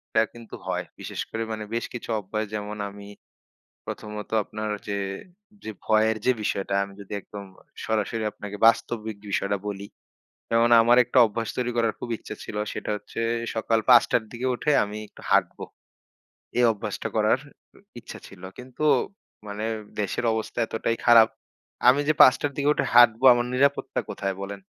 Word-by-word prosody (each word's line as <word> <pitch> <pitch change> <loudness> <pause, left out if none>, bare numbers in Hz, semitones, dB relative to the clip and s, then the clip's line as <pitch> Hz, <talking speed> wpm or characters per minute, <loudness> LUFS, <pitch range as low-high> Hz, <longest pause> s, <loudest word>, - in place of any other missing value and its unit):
এটা 110 - +5
কিন্তু 115 -1 -10
হয়। - - -1 0.2
বিশেষ - - -5
করে 115 0 -3
মানে 110 -1 -4
বেশ 115 - -1
কিছু 120 - -7
অভ্যাস 110 +2 -3
যেমন 105 0 -5
আমি 100 0 -12 0.8
প্রথমত 105 -1 -7
আপনার 105 +1 -5 0.2
যে 100 -1 -2 0.7
যে 110 - -5
ভয়ের 110 0 +2
যে 130 - +5
বিষয়টা 100 -2 -2
আমি 100 0 -9
যদি 100 - -9
একদম 100 +1 -9 0.4
সরাসরি 110 0 -1
আপনাকে 105 0 -8
বাস্তবিক 110 -2 0
বিষয়টা 100 0 0
বলি। 100 -1 -5 0.7
যেমন 115 +1 +3
আমার 120 +2 +5
একটা 125 +2 +1
অভ্যাস 115 +1 -4
তৈরি 125 -1 -1
করার 115 -2 +2
খুব - - -6
ইচ্ছে 110 - -9
ছিল। - - -7 0.2
সেটা - - -5
হচ্ছে 105 +2 -8 0.3
সকাল 115 0 +1
৫ 120 -2 +9
টার 120 - +2
দিকে 120 +2 -4
উঠে 150 - -1
আমি 105 +1 -7
একটু - - -17
হাঁটব। - - +2 1.0
এই 125 - +4
অভ্যাসটা 105 - -5
করার - - +3 0.6
ইচ্ছা - - -10
ছিল। 95 -2 -15 0.2
কিন্তু 130 +4 -8 0.6
মানে 105 +1 -4 0.3
দেশের 105 +3 -2
অবস্থা 110 +1 -4
এতটাই 115 +1 -1
খারাপ 115 -2 +8 0.6
আমি 130 +3 +6
যে 155 - +4
৫ 130 - +9
টার 145 - -1
দিকে 145 0 +1
উঠে - - -1
হাঁটব 120 -1 +7
আমার 120 0 0
নিরাপত্তা 140 +2 +1
কোথায় 95 -1 -3
বলেন? 100 0 -6
110 Hz, 165 wpm, -25 LUFS, 105-120 Hz, 1.0 s, ৫